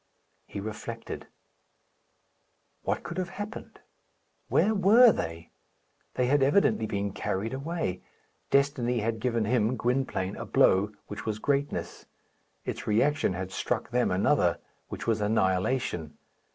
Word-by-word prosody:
He -, -, -6 dB
reflected. 110 Hz, +2 st, -6 dB, 1.5 s
What -, -, -2 dB
could 170 Hz, +2 st, -5 dB
have 185 Hz, -1 st, -2 dB
happened? 205 Hz, +3 st, -7 dB, 0.7 s
Where 220 Hz, -, +3 dB
were 220 Hz, +5 st, +7 dB
they? 85 Hz, -, -5 dB, 0.6 s
They 125 Hz, -, +2 dB
had 140 Hz, +3 st, +3 dB
evidently 135 Hz, -, +3 dB
been 100 Hz, -2 st, -2 dB
carried 105 Hz, +2 st, -2 dB
away. 140 Hz, -, -3 dB, 0.5 s
Destiny 130 Hz, -4 st, +2 dB
had 110 Hz, +1 st, -1 dB
given 115 Hz, -2 st, 0 dB
him, 120 Hz, +1 st, +1 dB
Gwynplaine, 120 Hz, -6 st, -1 dB
a -, -, -5 dB
blow, 100 Hz, +3 st, +4 dB
which 105 Hz, -, -7 dB
was 110 Hz, -1 st, -1 dB
greatness; 140 Hz, +5 st, -2 dB, 0.6 s
its -, -, -5 dB
reaction 115 Hz, +1 st, +2 dB
had 95 Hz, +1 st, -5 dB
struck 95 Hz, -, -2 dB
them 125 Hz, 0 st, +2 dB
another, 90 Hz, +2 st, +2 dB, 0.3 s
which -, -, -6 dB
was 115 Hz, -2 st, +1 dB
annihilation. 95 Hz, -, 0 dB
115 Hz, 125 wpm, -28 LUFS, 100-140 Hz, 1.5 s, were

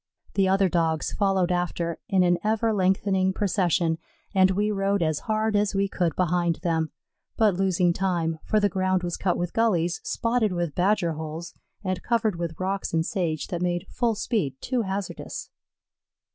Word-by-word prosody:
The 195 Hz, -1 st, +3 dB
other 195 Hz, 0 st, +3 dB
Dogs 165 Hz, -3 st, 0 dB
followed 190 Hz, -3 st, +1 dB
after, 175 Hz, -1 st, -1 dB
in 190 Hz, -2 st, +4 dB
an 175 Hz, -1 st, +3 dB
ever 220 Hz, +1 st, +1 dB
lengthening 190 Hz, -1 st, +2 dB
procession, 175 Hz, -5 st, +1 dB, 0.3 s
and 190 Hz, -1 st, +5 dB
we 205 Hz, +3 st, +1 dB
rode 200 Hz, -2 st, +1 dB
as 155 Hz, -2 st, 0 dB
hard 215 Hz, 0 st, +1 dB
as 205 Hz, -1 st, +1 dB
we 200 Hz, 0 st, +2 dB
could 175 Hz, -5 st, -1 dB
behind 175 Hz, -1 st, +1 dB
them, 160 Hz, -3 st, 0 dB, 0.5 s
but 215 Hz, -3 st, +4 dB
losing 180 Hz, -2 st, +2 dB
time, 170 Hz, -4 st, -1 dB
for 215 Hz, -, +2 dB
the 205 Hz, -, +3 dB
ground 185 Hz, -1 st, 0 dB
was 175 Hz, -1 st, -2 dB
cut 185 Hz, -2 st, 0 dB
with 175 Hz, 0 st, -3 dB
gullies, 180 Hz, -7 st, +1 dB
spotted 230 Hz, -4 st, 0 dB
with 175 Hz, -4 st, -2 dB
badger 180 Hz, -1 st, +2 dB
holes, 160 Hz, +2 st, -6 dB, 0.3 s
and 185 Hz, -2 st, -2 dB
covered 230 Hz, -4 st, +1 dB
with 170 Hz, -2 st, -4 dB
rocks 190 Hz, -1 st, -2 dB
and 160 Hz, 0 st, +2 dB
sage 170 Hz, -6 st, -2 dB
that 175 Hz, -3 st, -3 dB
made 175 Hz, 0 st, -1 dB
full 235 Hz, -3 st, 0 dB
speed 205 Hz, -, -1 dB
too 255 Hz, -1 st, -1 dB
hazardous. 195 Hz, -1 st, -5 dB
185 Hz, 170 wpm, -26 LUFS, 170-200 Hz, 0.5 s, and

